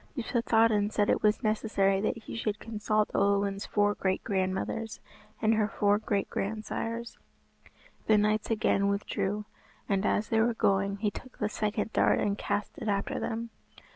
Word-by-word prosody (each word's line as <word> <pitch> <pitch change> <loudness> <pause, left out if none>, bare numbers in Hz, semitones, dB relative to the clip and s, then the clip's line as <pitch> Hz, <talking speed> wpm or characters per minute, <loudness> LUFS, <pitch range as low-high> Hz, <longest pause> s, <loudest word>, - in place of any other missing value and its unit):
Yspathaden 225 -3 +2
said 205 -1 +2
it - - +1
was 210 +3 +2
necessary 205 -3 +1
that 215 - 0
he 230 - -8
should 215 -2 -2
consult 215 -1 -1
Olwen's 200 0 +1
four 205 0 +2
great 190 -2 -1
grandmothers 190 +3 -2 0.4
and 220 0 +3
her 215 -1 +2
four 205 -1 +2
great 205 -2 -1
grand 215 +2 -3
sires. 230 +1 -4 0.9
The 215 - +5
knights 210 +1 +1
again 210 -3 +2
withdrew, 200 +1 -1 0.4
and 195 -1 +1
as 210 +1 +1
they 225 - +2
were 235 0 +2
going 200 -1 +1
he 205 0 0
took 255 +5 -11
the 210 - -1
second 215 +1 -2
dart - - +3
and 200 -1 +1
cast 205 0 -3
it - - -5
after 200 -1 -1
them. 230 +1 -3
210 Hz, 165 wpm, -29 LUFS, 200-220 Hz, 0.9 s, The